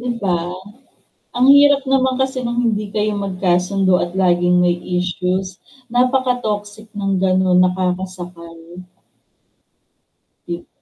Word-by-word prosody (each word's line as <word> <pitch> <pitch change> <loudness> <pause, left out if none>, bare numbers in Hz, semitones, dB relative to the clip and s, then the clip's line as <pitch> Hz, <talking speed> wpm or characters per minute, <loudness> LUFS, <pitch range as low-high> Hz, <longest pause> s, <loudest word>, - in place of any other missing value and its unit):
'Di 245 +1 -3
ba? 185 -3 +1 1.0
Ang 250 +1 +3
hirap 285 -1 +4
naman 260 -1 +2
kasi 265 0 -2
nung 240 -1 -3
hindi 215 -2 0
kayo 210 0 0
magkasundo 185 0 0
at 175 - -8
laging 175 -1 +2
may 175 0 +2 0.2
issues, 180 +1 -2 0.5
napaka-toxic 245 -5 -1
ng 195 -1 -1
ganon, 185 -1 +2
nakakasakal. 180 -2 -4 1.9
Kit 175 0 -6
190 Hz, 105 wpm, -18 LUFS, 180-235 Hz, 1.9 s, hirap